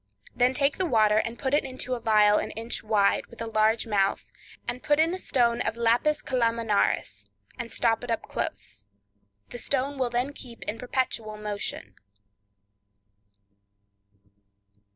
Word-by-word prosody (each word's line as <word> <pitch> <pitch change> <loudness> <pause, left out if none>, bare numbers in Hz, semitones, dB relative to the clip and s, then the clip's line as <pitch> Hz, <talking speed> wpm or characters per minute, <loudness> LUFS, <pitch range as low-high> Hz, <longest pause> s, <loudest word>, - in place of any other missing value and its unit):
Then 250 +1 +3
take 280 +3 +1
the 375 - +1
water 215 -5 +4
and 230 +1 -3
put 265 +2 -2
it 290 - +4
into 255 -1 -4
a 245 - -3
phial 210 -2 +5
an - - -3
inch 230 +1 -3
wide, 210 -2 +2
with 235 - -15
a 230 - -3
large 220 +1 +2
mouth, 200 -3 0 0.4
and 250 - -2
put 295 0 +2
in 325 +2 +3
a 370 - -3
stone 235 -8 +1
of 225 - -2
lapis 240 +6 +2
calaminaris, 225 - 0 0.3
and 230 -1 -5
stop 225 0 +1
it 245 - -6
up 230 - -1
close; 100 0 -5 0.6
the 240 - -6
stone 275 +2 -1
will 255 -2 +1
then 245 +4 -1
keep 240 -4 -10
in 215 +2 -4
perpetual 235 -4 -2
motion. 205 - -4
230 Hz, 150 wpm, -27 LUFS, 215-255 Hz, 0.6 s, phial